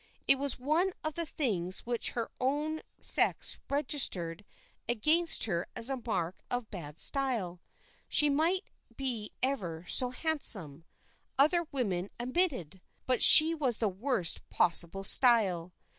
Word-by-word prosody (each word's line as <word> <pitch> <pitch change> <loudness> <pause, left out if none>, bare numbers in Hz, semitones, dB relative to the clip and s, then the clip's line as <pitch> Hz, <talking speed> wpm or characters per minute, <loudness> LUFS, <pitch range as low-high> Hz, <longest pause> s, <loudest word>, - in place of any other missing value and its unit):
It 275 - +4
was 280 -1 -3
one 315 +8 -1
of 310 0 -3
the 335 0 -3
things 190 - -2
which 240 -1 -4
her 230 -2 -5
own 295 +4 -3 0.2
sex - - +3
registered 225 - -1 0.5
against 310 +9 +1
her 175 -6 -2
as 240 +4 -4
a 265 -2 -5
mark 180 -6 -4
of 245 -3 -5
bad 160 -6 -9
style. 230 -11 +1 0.5
She 300 - +1
might 325 +7 0 0.3
be 240 -6 -5
ever 180 -11 -4
so 250 - -1
handsome, 205 - 0 0.5
other 320 +4 +1
women 200 -8 -3
admitted, 250 - -3 0.2
but 255 -2 -1
she 320 +2 +10
was 265 -8 -1
the 220 - -1
worst 195 -2 -2
possible 175 +2 +1
style. 195 -7 +2
245 Hz, 130 wpm, -29 LUFS, 185-290 Hz, 0.5 s, she